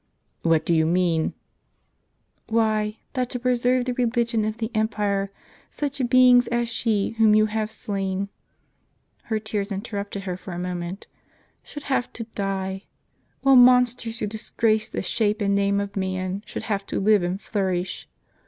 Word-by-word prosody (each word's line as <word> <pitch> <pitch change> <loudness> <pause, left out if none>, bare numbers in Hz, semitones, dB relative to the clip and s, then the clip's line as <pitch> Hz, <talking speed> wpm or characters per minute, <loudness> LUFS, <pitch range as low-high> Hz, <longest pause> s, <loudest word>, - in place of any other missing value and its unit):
" - - -47
What 160 -1 +3
do 170 - +2
you 160 -1 +3
mean? 170 -2 +1 0.5
" - - -38
"Why, 215 -1 +1 0.2
that 255 -3 -1
to 250 - -3
preserve 250 0 +2
the 250 - -1
religion 235 -2 0
of 215 +1 -3
the 225 0 -3
empire 205 -2 0 0.4
such 285 -2 -3
beings 250 -1 +6
as 235 0 0
she 220 -3 0
whom 215 -1 +6
you 215 0 +5
have 215 0 -2
slain 195 -2 -3 0.5
" - - -43
(her 220 - -1
tears 215 -1 -3
interrupted 200 -1 -4
her 180 -2 -4
for 185 0 -8
a - - -5
moment) 180 +1 -4 0.3
" - - -38
should 290 - -9
have 265 -3 -1
to 230 - -5
die; 195 -1 -3 0.6
while 270 0 +5
monsters 250 -2 +5
who - - -2
disgrace 220 0 0
the - - -4
shape 210 +2 0
and 200 -1 +1
name 200 0 +2
of 200 0 -4
man 185 0 -2
should - - -5
have 200 -3 -2
to - - -2
live 210 0 +4
and 175 +2 -2
flourish. 190 -4 -2
210 Hz, 170 wpm, -24 LUFS, 195-235 Hz, 0.6 s, beings